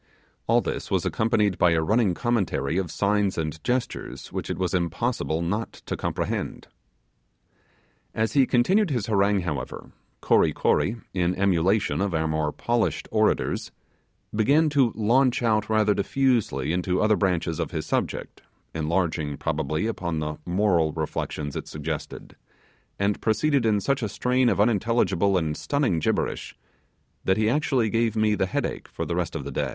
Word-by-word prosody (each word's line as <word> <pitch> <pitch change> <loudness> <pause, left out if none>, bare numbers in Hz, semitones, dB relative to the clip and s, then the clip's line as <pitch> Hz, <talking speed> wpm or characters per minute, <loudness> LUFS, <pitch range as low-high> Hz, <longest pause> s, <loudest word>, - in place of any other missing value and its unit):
All - - +4
this - - -4
was - - 0
accompanied 105 -3 +1
by 85 -1 +4
a 80 - +2
running 105 -1 +2
commentary 95 - 0
of 90 -3 -3
signs 100 +2 0
and 80 -1 -3
gestures 125 0 -3
which - - -4
it - - -2
was 90 -2 -1
impossible 85 -1 -1
not 105 +7 -2
to - - -6
comprehend. - - -3 1.5
As 110 0 0
he 135 -3 +4
continued 185 - +3
his 120 -7 -1
harangue, 100 -2 +2
however, 75 -8 -5 0.3
Kory - - +3
Kory, 105 - +1 0.2
in 90 -1 0
emulation 95 +1 +1
of 100 -4 0
our 80 0 0
more 80 -1 0
polished 120 +5 -1
orators, 110 -1 +1 0.6
began 140 +9 +3
to 135 -5 +3
launch 120 +4 +2
out 110 -2 +1
rather 110 -1 +3
diffusely 105 - 0
into 90 +1 0
other 110 0 +3
branches 85 -4 0
of 85 - -1
his 80 -4 -4
subject, - - -3 0.3
enlarging 80 -2 -1
probably 80 +5 -1
upon 90 -7 -2
the 75 0 -3
moral 90 -4 +2
reflections 75 -2 -4
it - - -5
suggested; 75 0 -6 0.6
and 100 +1 0
proceeded 115 +3 +2
in 105 -2 +3
such 140 +6 0
a 110 - -2
strain 125 +3 +1
of - - 0
unintelligible 105 -2 +2
and 80 -3 -1
stunning 140 - 0
gibberish, - - -2 0.7
that 95 - +2
he 110 0 +2
actually 130 -2 +1
gave 115 -1 +1
me 110 -1 +2
the 95 -2 0
headache - - -3
for - - -5
the - - -2
rest - - -2
of - - -3
the - - -5
day. - - -1
100 Hz, 155 wpm, -25 LUFS, 85-115 Hz, 1.5 s, All